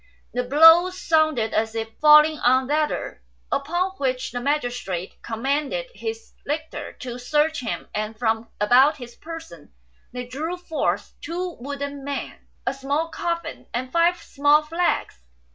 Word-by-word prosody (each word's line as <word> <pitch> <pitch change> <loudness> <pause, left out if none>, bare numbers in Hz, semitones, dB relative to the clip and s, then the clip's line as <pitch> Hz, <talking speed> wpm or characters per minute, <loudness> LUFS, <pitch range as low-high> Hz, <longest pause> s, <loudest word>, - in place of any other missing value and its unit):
The 250 - 0
blows 325 +7 +6
sounded 310 -9 +2
as 220 +1 0
if 225 0 -3
falling 300 0 +7
on 260 +1 +3
leather, 300 +2 -1 0.3
upon 345 +7 0
which 260 -1 -1
the 245 0 -4
magi 280 -1 +1
strate 190 -7 -6
commanded 285 - -2
his 450 -1 -6
lictors 300 0 -4
to 245 -1 -6
search 300 +5 +1
him; 235 - -4
and 215 +1 -3
from 225 0 0
about 250 +8 +5
his 240 -3 -10
person 320 - -10 0.4
they 250 0 -5
drew 310 +8 -4
forth 350 -3 -2
two 355 +1 -4
wooden 280 +1 -5
men, 280 0 -6 0.2
a - - 0
small 285 +4 -2
coffin, 335 0 -4
and 255 +1 -3
five 340 +3 +3
small 290 -1 +3
flags. 330 - -1
285 Hz, 145 wpm, -23 LUFS, 245-320 Hz, 0.4 s, falling